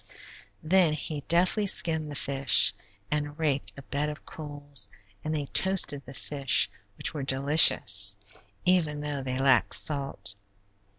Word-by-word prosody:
Then 170 -1 +2
he 150 0 -6
deftly 185 +5 +1
skinned 160 -4 +1
the 145 - -8
fish, 140 -1 +2 0.4
and 150 0 -4
raked 145 -4 -2
a 140 - -11
bed 145 +2 -4
of 150 - -10
coals, 145 -7 -3 0.3
and 155 +1 -4
they 145 -2 -4
toasted 160 -4 +3
the 135 - -12
fish, 140 -3 0 0.3
which - - -4
were 150 - -6
delicious, 130 -8 +3 0.5
even 160 -5 0
though 145 -2 -5
they 130 -1 -5
lacked 135 -1 +2
salt. 140 -8 +3
145 Hz, 135 wpm, -26 LUFS, 135-155 Hz, 0.5 s, toasted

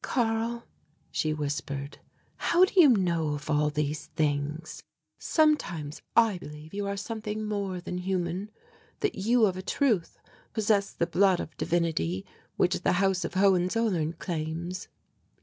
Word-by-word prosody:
"Karl," 230 -1 0 0.5
she 155 - 0
whispered, 145 -1 -4 0.4
"how 350 +2 +4
do - - -9
you 300 - +8
know 170 - +2
of 150 +1 -5
all 150 0 +3
these 150 0 -2
things? 150 +1 -1 0.4
Sometimes 175 - +1
I 225 -5 +4
believe 150 +1 -10
you 200 0 -2
are 200 0 -2
something 215 0 -4
more 200 -3 -2
than 180 +1 -5
human, 185 +1 -2 0.5
that 415 - +1
you 225 +4 +3
of 185 -3 0
a - - -4
truth 220 - 0 0.4
possess 210 -2 +2
the 170 - 0
blood 190 +1 +3
of 155 - -6
divinity 155 - 0 0.3
which - - +2
the - - +2
House 190 0 +2
of - - -5
Hohenzollern 185 -2 +2
claims." 170 +2 -4
180 Hz, 140 wpm, -28 LUFS, 155-210 Hz, 0.5 s, you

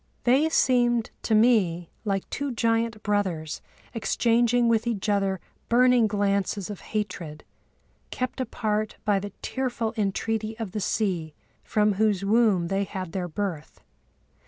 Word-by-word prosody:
They 270 +6 +4
seemed 240 -6 +2
to 220 - +1
me 200 -7 +3
like 195 -2 -1
two 280 -1 -2
giant 230 -2 0
brothers 185 -7 -1 0.3
exchanging 235 +1 +2
with 230 0 +2
each 220 -4 -2
other 195 -2 +1 0.3
burning 245 -1 +5
glances 200 -1 0
of 205 - -7
hatred, 185 -8 -4 0.7
kept 255 +1 -3
apart 215 -4 -2
by 205 -2 +3
the 205 +1 -5
tearful 245 -4 -2
entreaty 220 +1 -1
of 225 -5 -5
the 210 - -3
sea 180 -7 -1 0.3
from 210 -1 +2
whose 200 -1 +1
womb 205 -5 +3
they 195 +1 +1
had 190 -3 -5
their 180 0 -3
birth. 175 -3 -4
210 Hz, 135 wpm, -26 LUFS, 195-230 Hz, 0.7 s, burning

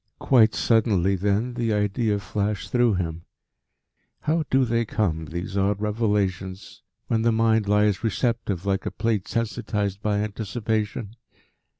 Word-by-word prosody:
Quite 115 -5 +4
suddenly, 100 -5 +2
then, 105 +6 0
the 120 -2 -1
idea 105 +1 +1
flashed 100 0 -3
through 120 -4 +3
him 85 -2 -4 1.0
how 160 +1 0
do 130 0 +3
they 115 0 +1
come, 90 -8 -1
these 85 +4 -5
odd 100 0 +1
revelations, 105 -3 -2 0.2
when 110 -1 0
the 115 +1 +3
mind 110 -1 +2
lies 105 -1 +2
receptive 110 -3 -1
like 95 -1 0
a - - +1
plate 110 -5 -1
sensitised 105 -3 -2
by 105 -1 0
anticipation? 110 0 -3
105 Hz, 130 wpm, -24 LUFS, 100-115 Hz, 1.0 s, Quite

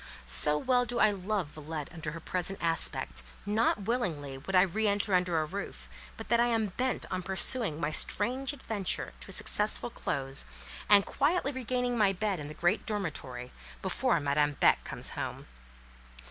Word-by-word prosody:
So 150 - +9
well 250 +8 +2
do 245 0 -3
I 215 -2 +5
love 195 -3 -3
Villette 155 +1 -7
under 160 -3 -6
her 165 - -7
present 185 +3 -3
aspect, 165 - +1 0.2
not 210 0 +1
willingly 175 - -2
would 165 +9 -5
I 185 - +7
re 210 +4 0
enter 205 0 0
under 180 -2 +2
a 155 - -1
roof, 195 +6 -7 0.3
but - - -8
that 235 - +3
I 240 - +4
am 225 -3 0
bent 255 0 -1
on 185 0 -2
pursuing 190 - +1
my 155 -2 -1
strange 255 - 0
adventure 215 - -4
to - - -10
a - - -8
successful - - -1
close, 135 0 -3 0.5
and 200 -1 +7
quietly 295 0 0
regaining 250 -2 -2
my 200 -2 +4
bed 195 -1 -2
in 145 - -6
the 155 - -9
great 175 +5 0
dormitory, 140 - -4 0.3
before 195 +2 +1
Madame 145 0 +1
Beck - - +3
comes - - -6
home. - - -5
190 Hz, 175 wpm, -30 LUFS, 155-225 Hz, 0.5 s, So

